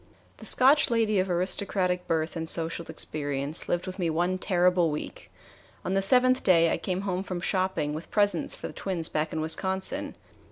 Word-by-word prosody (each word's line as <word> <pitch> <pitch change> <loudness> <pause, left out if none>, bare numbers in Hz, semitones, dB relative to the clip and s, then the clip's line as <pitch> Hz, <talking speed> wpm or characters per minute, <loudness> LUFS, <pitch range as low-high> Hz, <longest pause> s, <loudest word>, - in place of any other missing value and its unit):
The - - -4
Scotch 275 +3 +5
lady 225 -3 +1
of 185 +1 0
aristocratic 180 0 0
birth 160 0 -1
and 165 -1 -4
social 165 0 -1
experience 145 0 -3
lived 175 0 -1
with 185 +1 -7
me 170 -2 0
one 175 +3 0
terrible 180 -2 +2
week. 150 0 -7 0.5
On 185 - -1
the 195 - +2
seventh 255 +5 +4
day 170 -3 +4
I - - 0
came 185 0 -3
home 190 -2 -2
from 185 -2 -5
shopping 185 -5 -1
with 155 +2 -7
presents 205 -1 +1
for - - -9
the - - -6
twins 175 -4 -3
back 155 +1 -2
in 160 - -3
Wisconsin. 190 +4 -2
180 Hz, 185 wpm, -27 LUFS, 165-195 Hz, 0.5 s, Scotch